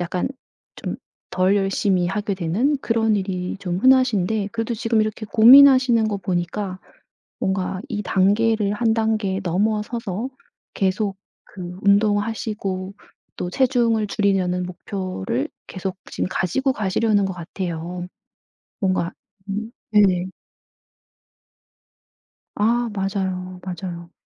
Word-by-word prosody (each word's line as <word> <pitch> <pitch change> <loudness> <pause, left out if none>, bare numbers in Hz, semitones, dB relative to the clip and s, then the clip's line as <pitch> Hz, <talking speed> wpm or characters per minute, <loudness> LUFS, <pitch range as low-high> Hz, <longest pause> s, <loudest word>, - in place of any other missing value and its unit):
약간 175 +4 -1 0.5
좀 - - -4 0.3
덜 185 +2 +2
열심히 195 -2 +1
하게 205 +3 -2
되는 195 - +1
그런 225 -3 +1
일이 185 -2 -3
좀 180 -2 -3
흔하신데 220 -5 +3
그래도 230 +1 -2
지금 225 0 +1
이렇게 215 0 -2
고민하시는 250 +1 +7
거 210 -1 -1
보니까 185 +1 -3 0.6
뭔가 190 -1 -1
이 210 -5 -3
단계를 205 +2 +2
1 225 +1 +1
단계 215 -4 0
넘어서서 210 +4 -1 0.5
계속 195 +1 0 0.3
그 180 -2 -8
운동하시고 205 -2 0 0.4
또 180 - -3
체중을 235 -2 +2
줄이려는 190 -4 +1
목표를 180 - -4 0.2
계속 185 -1 -5
지금 - - -2
가지고 265 +10 0
가시려는 210 -1 +1
것 190 - -3
같아요. 175 0 -5 0.7
뭔가 185 -3 0 0.4
음. 215 +3 -3 0.2
네. 190 -4 +4 2.3
아 235 +3 +1
맞아요, 190 -2 -3
맞아요. 175 -1 -6
200 Hz, 235 characters per minute, -22 LUFS, 185-220 Hz, 2.3 s, 고민하시는